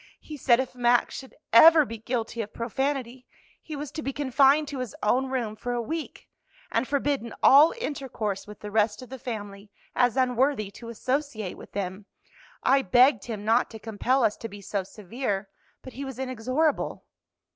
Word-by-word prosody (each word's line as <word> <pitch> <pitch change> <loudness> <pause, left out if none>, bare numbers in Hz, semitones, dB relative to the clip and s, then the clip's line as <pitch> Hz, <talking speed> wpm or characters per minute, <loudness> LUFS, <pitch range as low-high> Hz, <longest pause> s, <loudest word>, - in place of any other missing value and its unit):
"He 305 - -9
said 245 -3 +3
if 260 -1 -2
Max 245 -1 +2
should 265 - -9 0.2
ever 315 +5 +8
be 230 -2 -7
guilty 230 0 -3
of 210 - -8
profanity 255 +1 -3 0.3
he 310 - -7
was 290 0 -6
to 315 - -5
be 275 - -3
confined 280 +2 +3
to 275 - -5
his 255 -3 -5
own 255 +5 +2
room 240 -5 -2
for 245 +3 -4
a 240 - -1
week, 310 +8 -5 0.4
and 230 +3 0
forbidden 280 -4 -1
all 290 +4 +8
intercourse 255 - -4
with 210 -1 -11
the 210 - -7
rest 210 +2 +1
of 255 - -13
the 265 0 -8
family 205 -4 -7 0.3
as 245 0 +2
unworthy 250 -4 +1
to 230 +3 -10
associate 240 -4 -3
with - - -14
them. 195 +1 -4 0.6
I 270 +1 +4
begged 245 +1 +4
him 215 -3 -6
not 225 +3 +3
to 225 - -9
compel 230 +4 0
us 215 -2 +2
to 225 - -7
be 205 0 -10
so 200 0 -3
severe, 205 +1 -4 0.3
but 260 - -10
he 275 - -6
was 265 -3 -7
inexorable." 255 +4 -1
245 Hz, 180 wpm, -26 LUFS, 215-270 Hz, 0.6 s, ever